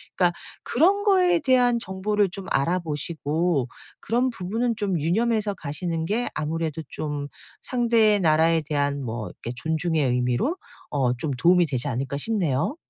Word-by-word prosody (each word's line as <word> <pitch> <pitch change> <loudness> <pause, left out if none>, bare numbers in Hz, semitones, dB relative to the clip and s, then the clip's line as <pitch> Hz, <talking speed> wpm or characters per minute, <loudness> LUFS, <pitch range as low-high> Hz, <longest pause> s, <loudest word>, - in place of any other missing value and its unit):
그러니까 175 -2 +2 0.3
'그런 385 +9 +3
거에 365 -4 +4
대한 250 -5 +3
정보를 200 +1 0
좀 190 +1 -8
알아보시고 160 -1 -1 0.3
그런 245 +2 +1
부분은 230 +4 -2
좀 195 -6 -1
유념해서 215 +5 +1
가시는 165 0 -4
게 225 +7 -1
아무래도 160 +1 -2
좀 145 -2 -4 0.3
상대의 230 -4 +3
나라에 160 0 +3
대한 145 -1 -1
뭐 110 -2 -4
이렇게 120 - -8
존중의 160 +1 0
의미로 125 - 0 0.3
어 130 -4 +1
좀 155 - -2
도움이 175 +2 +4
되지 130 0 -2
않을까?' 135 +2 -2
싶네요. 175 - 0
170 Hz, 320 characters per minute, -24 LUFS, 145-220 Hz, 0.3 s, 거에